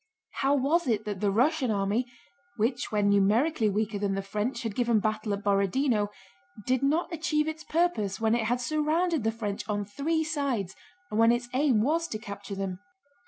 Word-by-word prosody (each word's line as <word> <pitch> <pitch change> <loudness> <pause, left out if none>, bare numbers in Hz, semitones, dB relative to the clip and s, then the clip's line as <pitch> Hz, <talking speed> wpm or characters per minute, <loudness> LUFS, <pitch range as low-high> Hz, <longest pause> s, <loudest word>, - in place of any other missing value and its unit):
How 275 +1 +3
was 295 +5 +1
it 220 -3 0
that 205 -3 -4
the 205 - +1
Russian 255 +6 +2
army, 205 +4 0 0.5
which 240 +4 -1
when 205 -1 +2
numerically 215 +6 +3
weaker 210 0 -1
than 200 -1 0
the 195 - -2
French 210 +6 -3
had 225 -3 -3
given 235 -1 +2
battle 215 0 -1
at 200 0 -2
Borodinó, 205 +3 +2 0.6
did 255 -1 +1
not 315 +5 +1
achieve 310 -2 0
its 315 0 -4
purpose 310 - 0
when 220 0 +2
it 235 -2 +1
had 245 +2 +1
surrounded 310 +3 0
the 225 - +1
French 210 -3 -4
on 205 -1 -1
three 310 +10 -1
sides 275 - -2 0.4
and 210 - 0
when 230 +1 +6
its 240 0 -1
aim 255 -5 +3
was 325 +5 +1
to 215 - -4
capture 200 -2 -7
them? 190 -2 -4
230 Hz, 185 wpm, -28 LUFS, 205-285 Hz, 0.6 s, when